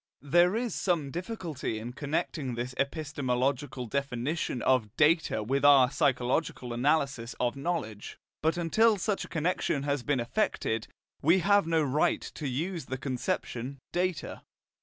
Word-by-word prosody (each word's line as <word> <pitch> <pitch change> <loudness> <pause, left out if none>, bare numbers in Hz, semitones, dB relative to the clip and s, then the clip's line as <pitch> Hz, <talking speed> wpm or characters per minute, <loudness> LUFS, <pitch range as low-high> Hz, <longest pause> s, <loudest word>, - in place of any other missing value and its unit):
There 175 +6 +4
is 235 -3 -1
some 165 -7 0
difficulty 175 - -4
in 115 +3 -6
connecting 145 -2 -2
this 120 +2 -4
epistemological 140 -2 -1
definition 135 +2 -2
of 115 -5 +1
"data" 155 -7 +3
with 135 +6 0
our 140 -3 +7
psychological 130 -3 0
analysis 135 -2 0
of 120 +1 0
knowledge; 140 -9 -4 0.2
but 160 +3 +1
until 215 +6 +3
such 200 +2 -1
a - - -14
connection 160 -3 0
has 140 -1 0
been 140 +1 0
effected, 115 - -1 0.3
we 165 +6 +5
have 200 -2 +4
no 165 -1 +2
right 145 +1 +1
to 150 - -4
use 160 +4 -3
the 130 - -4
conception 130 0 -3
"data." 180 -2 -2
140 Hz, 140 wpm, -29 LUFS, 125-165 Hz, 0.3 s, our